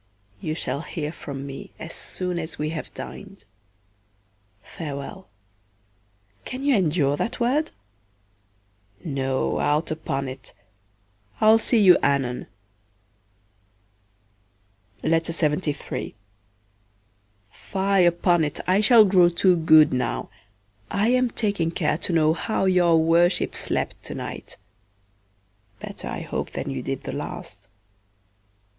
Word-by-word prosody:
You 155 +7 -3
shall 140 -2 -2
hear 155 -2 -5
from 140 -4 -7
me 140 -1 -9
as 160 - -8
soon 180 -2 -4
as 160 0 -6
we 150 0 -2
have 155 -1 -6
dined. 195 - -9 1.2
Farewell; 150 - -7 1.1
can 255 +2 -6
you 280 -2 +3
endure 155 -7 +2
that 230 - -3
word? 265 +6 +1 1.4
No, 135 -3 -1
out 150 +3 +1
upon't. 135 -6 -4 0.8
I'll 220 +1 +6
see 235 - +2
you 185 -4 +7
anon. 135 -3 0 2.6
Fye 160 -1 -1 1.9
upon't 175 -3 +2
I 190 +3 +3
shall 220 0 +7
grow 185 -3 +5
too 180 +1 +3
good 155 -3 +5
now, 125 - -2 0.6
I 205 +3 +1
am 250 0 +3
taking 200 -8 -1
care 165 -1 -1
to 180 - -2
know 160 -2 +3
how 205 +3 -1
your 175 -3 +4
worship 170 +3 +3
slept - - -1
to - - -5
night; - - -7 1.2
better - - -7
I - - -4
hope - - -4
than - - -4
you - - -4
did - - -4
the - - -5
last. 100 0 -7
165 Hz, 110 wpm, -24 LUFS, 150-190 Hz, 2.6 s, you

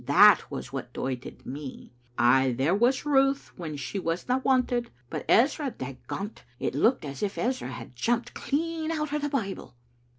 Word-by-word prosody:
That - - +7
was - - -6
what - - -5
doited 130 -1 -5
me. 140 0 -7 0.3
Ay, 125 +2 +4
there 145 +7 +2
was 245 +7 +2
Ruth 275 -1 +2
when 160 -5 -5
she 140 +9 -4
wasna 185 +9 0
wanted, 250 -2 +1 0.2
but - - -4
Ezra, 275 +4 +4
dagont, 170 - -6 0.2
it - - -1
looked 200 - +2
as 140 -1 -6
if 205 -1 -2
Ezra 250 - -1
had 125 -1 -8
jumped 240 - 0
clean 320 +2 -2
out 305 -2 -2
o' 300 - +1
the 290 0 -1
Bible." 200 - -3
230 Hz, 165 wpm, -28 LUFS, -, 0.3 s, That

